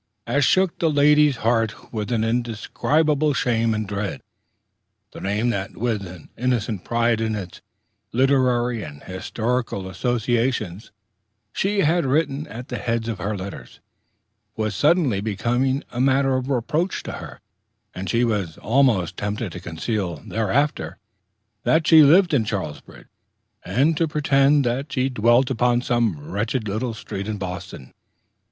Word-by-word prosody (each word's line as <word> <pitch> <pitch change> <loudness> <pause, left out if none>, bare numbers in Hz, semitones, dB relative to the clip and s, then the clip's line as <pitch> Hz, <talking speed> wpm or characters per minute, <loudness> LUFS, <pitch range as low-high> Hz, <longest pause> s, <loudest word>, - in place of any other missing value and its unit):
as 145 0 +1
shook 185 +5 +2
the 165 - +2
lady's 150 -1 +4
heart 115 -1 0
with 105 0 -3
an 115 -2 +1
indescribable 140 +6 0
shame 115 -2 +1
and 110 -1 -2
dread. 100 0 -4 0.9
The - - -10
name 105 +5 0
that, 100 -2 -4
with 110 -4 -1
an 85 -3 -12
innocent 115 -5 -1
pride 115 -1 +1
in 110 -1 -1
its 95 -4 -7 0.5
literary 125 -2 +2
and 75 -5 -9
historical 110 +2 -3
associations, 115 -2 -1 0.6
she 200 +1 +1
had 170 +2 +2
written 145 +1 0
at 120 0 -9
the - - -4
heads 115 -2 -2
of 115 -4 -3
her 100 +3 -2
letters, 95 +1 -8 0.8
was 110 -1 -2
suddenly 145 - +2
become 120 +6 0
a 120 - -2
matter 135 0 +3
of 130 +1 -2
reproach 150 +8 -1
to - - -5
her; - - -10 0.5
and 95 +1 -5
she 115 +1 +2
was 100 -8 -2
almost 115 -8 +2
tempted 105 0 -3
to 90 - -7
conceal 90 +2 -3
thereafter 125 +7 -1 0.6
that 160 +6 +2
she 160 0 +8
lived 170 +4 +6
in 130 -6 +3
Charlesbridge, 100 -8 -6 0.6
and 150 +6 +2
to 165 - +2
pretend 140 -1 +3
that 135 +4 -2
she 130 0 0
dwelt 120 +2 +3
upon 120 0 +2
some 120 - +1
wretched 110 +3 -2
little 110 +3 -2
street 100 -2 -6
in 110 -1 -3
Boston. 90 -7 -7
120 Hz, 145 wpm, -22 LUFS, 105-135 Hz, 0.9 s, she